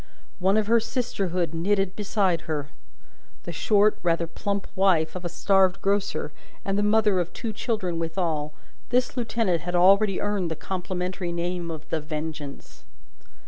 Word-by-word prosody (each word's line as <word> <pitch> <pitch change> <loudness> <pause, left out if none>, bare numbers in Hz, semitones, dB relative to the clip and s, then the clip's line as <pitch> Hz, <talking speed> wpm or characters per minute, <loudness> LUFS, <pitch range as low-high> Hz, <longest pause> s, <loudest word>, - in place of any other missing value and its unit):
One 190 +3 +3
of 215 - +2
her 230 +2 +4
sisterhood 195 - -2
knitted 195 +3 +1
beside 195 -5 +1
her. 145 -2 -2 0.7
The - - -5
short, 210 0 +3
rather 170 -1 +1
plump 200 +4 -3
wife 185 -5 +3
of 180 - -5
a 175 - -2
starved 190 +1 +3
grocer, 195 -6 0 0.3
and 195 - 0
the 205 - +2
mother 210 -2 +3
of 175 -1 -2
two 225 -2 -4
children 195 -7 -2
withal, 160 -3 -1 0.4
this 250 +1 +1
lieutenant 225 - 0
had 175 +1 -3
already 195 +2 +5
earned 205 -4 -1
the 160 - -3
complimentary 180 +1 -3
name 170 0 -2
of 155 -2 -7
The 160 - 0
Vengeance. 150 -2 -6
185 Hz, 150 wpm, -25 LUFS, 170-205 Hz, 0.7 s, already